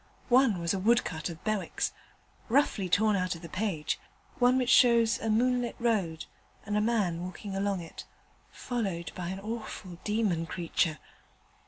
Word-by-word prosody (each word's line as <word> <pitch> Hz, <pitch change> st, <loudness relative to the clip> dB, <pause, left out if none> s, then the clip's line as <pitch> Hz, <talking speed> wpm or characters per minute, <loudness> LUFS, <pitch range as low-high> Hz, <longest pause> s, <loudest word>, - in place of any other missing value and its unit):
One 250 Hz, -5 st, +5 dB
was 170 Hz, +1 st, 0 dB
a 195 Hz, -, -1 dB
woodcut 185 Hz, -7 st, +1 dB
of 165 Hz, -1 st, -9 dB
Bewick's, 215 Hz, -3 st, -1 dB, 0.6 s
roughly 225 Hz, -7 st, +2 dB
torn 210 Hz, +4 st, +3 dB
out 185 Hz, -2 st, 0 dB
of 165 Hz, -, -12 dB
the -, -, -6 dB
page: 185 Hz, -4 st, -2 dB, 0.4 s
one 250 Hz, +1 st, +5 dB
which 255 Hz, -1 st, +2 dB
shows 235 Hz, -3 st, +5 dB
a 225 Hz, -, -2 dB
moonlit 245 Hz, +2 st, +1 dB
road 195 Hz, -9 st, 0 dB, 0.4 s
and 205 Hz, 0 st, -2 dB
a 210 Hz, -, +3 dB
man 205 Hz, -7 st, +1 dB
walking 190 Hz, +2 st, -6 dB
along 195 Hz, -1 st, 0 dB
it, 165 Hz, -, -9 dB, 0.5 s
followed 195 Hz, -10 st, -3 dB
by 180 Hz, -2 st, -5 dB
an 190 Hz, +2 st, -4 dB
awful 210 Hz, -4 st, -6 dB
demon 210 Hz, -6 st, 0 dB
creature. 165 Hz, -2 st, 0 dB
200 Hz, 155 wpm, -29 LUFS, 175-230 Hz, 0.6 s, One